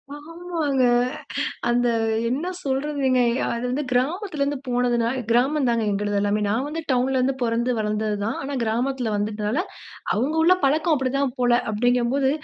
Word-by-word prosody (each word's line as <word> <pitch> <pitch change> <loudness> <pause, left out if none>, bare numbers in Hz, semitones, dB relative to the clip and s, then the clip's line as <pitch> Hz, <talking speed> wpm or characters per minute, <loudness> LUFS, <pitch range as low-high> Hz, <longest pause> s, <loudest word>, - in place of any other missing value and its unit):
ஆமாங்க. 315 -3 -2 0.9
அந்த 245 0 +2 0.4
என்ன 285 +8 -2 0.2
சொல்றதுங்க. 270 -1 0 0.3
அது 235 - -3
வந்து 270 +4 -1
கிராமத்தில 305 - -1
இருந்து 285 +1 0
போனதுன்னால 245 0 +1
கிராமம் 260 +4 +2
தான்ங்க 230 -1 +1
எங்களுது 205 0 -1
எல்லாமே. 205 +1 +1
நான் 225 +6 0
வந்து 320 +2 -4
டவுன்ல 260 +1 +1
இருந்து 260 +1 +1
பொறந்து 235 +1 0
வளர்ந்தது 215 0 -1
தான். 225 - -2
ஆனா 280 +1 -5
கிராமத்தில 240 +1 -1
வந்துட்டதால, 210 +6 -1 0.5
அவங்க 260 +8 0
உள்ள 355 +3 +6
பழக்கம் 310 +4 +3
அப்படித்தான் 265 0 -1
போல. 245 0 +3 0.2
அப்படிங்கம்போது 245 +4 +2
255 Hz, 140 wpm, -23 LUFS, 235-280 Hz, 0.9 s, உள்ள